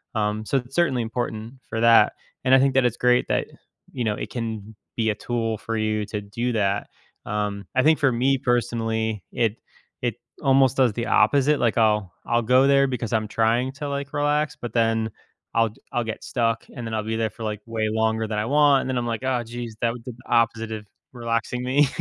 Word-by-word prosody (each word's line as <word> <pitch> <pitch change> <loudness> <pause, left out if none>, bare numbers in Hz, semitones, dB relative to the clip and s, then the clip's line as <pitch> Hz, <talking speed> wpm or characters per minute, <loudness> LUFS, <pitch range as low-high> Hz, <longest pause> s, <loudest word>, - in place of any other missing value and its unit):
Um, 105 0 0
so 135 - +1
it's 125 +1 -5
certainly 135 -9 +2
important 115 0 -4 0.2
for 115 - -2
that, 115 0 +6 0.3
and 130 +1 +5
I - - +6
think 135 0 +3
that 135 - +4
it's 120 -1 0
great 125 0 +3
that, - - +1 0.5
you 125 - -2
know, 105 -2 0
it - - -6
can 110 -3 -5 0.2
be 110 -1 +1
a - - -4
tool 115 -1 -2
for 115 +1 -3
you 110 0 0
to 105 -1 -3
do 115 +5 -3
that. 100 -2 0 0.4
Um, 105 -1 -2
I 130 - +4
think 155 0 +4
for 135 -3 +3
me 130 +3 +2
personally, 115 -4 -1
it 115 -2 0 0.4
it 120 -3 -1 0.3
almost 135 -2 +4
does 130 -5 +4
the 115 +2 -3
opposite. 140 +7 +3
Like, 120 -1 +1
I'll 105 -4 +2
I'll 120 0 +2
go 125 +4 +4
there 140 0 +5
because 120 -3 -3
I'm 110 -1 +1
trying 115 +4 +1
to, 145 +1 -5
like, 140 -1 -4
relax, 145 0 0
but 120 - -5
then 115 -1 +1 0.4
I'll 115 -1 +3
g 105 - -19
I'll 120 - +1
get 110 -1 -5
stuck, 115 -2 -1
and 120 -2 -5
then 110 - -5
I'll 110 - -1
be 110 +1 -2
there 110 -1 0
for, 110 +2 -10
like, 105 -1 -3
way 110 -1 -1
longer 110 0 +1
than 105 -1 -2
I 105 - -1
want, 145 +1 +4
and - - -4
then 130 - 0
I'm 120 - -1
like, 115 0 -2
"Oh, 130 -2 0
jeez." 120 0 -6
That 115 -1 +1
would 120 -1 -10
do 125 - -6
the 120 - -14
opposite 115 -1 +2
of 110 -1 -5 0.3
relaxing 115 0 -2
me. 135 +3 +3
115 Hz, 225 wpm, -24 LUFS, 110-130 Hz, 0.5 s, that